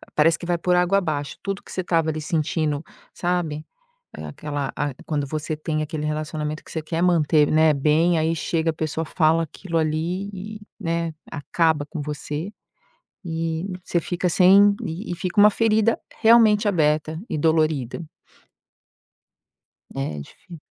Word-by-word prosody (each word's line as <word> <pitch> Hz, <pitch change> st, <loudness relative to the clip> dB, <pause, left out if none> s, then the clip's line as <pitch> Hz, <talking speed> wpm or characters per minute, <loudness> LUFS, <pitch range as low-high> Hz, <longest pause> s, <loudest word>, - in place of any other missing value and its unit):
parece 165 Hz, +2 st, +4 dB
que -, -, -7 dB
vai 175 Hz, 0 st, 0 dB
por 180 Hz, +1 st, +1 dB
água 180 Hz, +2 st, +3 dB
abaixo. 150 Hz, -6 st, -3 dB
Tudo 195 Hz, 0 st, -3 dB
que -, -, -13 dB
você 185 Hz, -, -3 dB
tava 165 Hz, -2 st, +1 dB
ali 155 Hz, 0 st, -3 dB
sentindo, 155 Hz, -1 st, -1 dB, 0.3 s
sabe, 170 Hz, -4 st, -2 dB, 0.5 s
eh, -, -, -7 dB
aquela 145 Hz, -2 st, -4 dB
a 145 Hz, -1 st, -2 dB
quando 145 Hz, -3 st, -2 dB
você 155 Hz, +2 st, -3 dB
tem 155 Hz, 0 st, -2 dB
aquele 150 Hz, 0 st, -4 dB
relacionamento 155 Hz, 0 st, -3 dB
que -, -, -12 dB
você 160 Hz, -, -2 dB
quer 165 Hz, +2 st, -2 dB
manter, 160 Hz, -4 st, +4 dB
né, 155 Hz, 0 st, +5 dB
bem, 160 Hz, +4 st, +3 dB
aí 160 Hz, +1 st, +1 dB
chega, 165 Hz, 0 st, 0 dB
a -, -, -3 dB
pessoa 160 Hz, +1 st, -3 dB
fala 160 Hz, 0 st, +2 dB
aquilo 165 Hz, +2 st, -6 dB
ali 165 Hz, +5 st, -1 dB
e, 210 Hz, +3 st, -8 dB, 0.2 s
né, 165 Hz, -3 st, -2 dB, 0.2 s
acaba 160 Hz, 0 st, 0 dB
com 155 Hz, +1 st, -6 dB
você 150 Hz, +4 st, -4 dB, 0.7 s
e 165 Hz, +2 st, -3 dB, 0.2 s
você 170 Hz, -, 0 dB
fica 180 Hz, +2 st, -1 dB
sem 195 Hz, +3 st, +6 dB
e 175 Hz, +4 st, -5 dB
e -, -, -1 dB
fica 180 Hz, +3 st, -4 dB
uma 210 Hz, +1 st, +8 dB
ferida 220 Hz, +1 st, +2 dB, 0.2 s
realmente 220 Hz, -2 st, +6 dB
aberta 155 Hz, -3 st, +1 dB
e -, -, -2 dB
dolorida. 155 Hz, -3 st, +1 dB, 1.9 s
É 75 Hz, +2 st, -3 dB
difí 170 Hz, -, -13 dB
160 Hz, 155 wpm, -23 LUFS, 155-180 Hz, 1.9 s, uma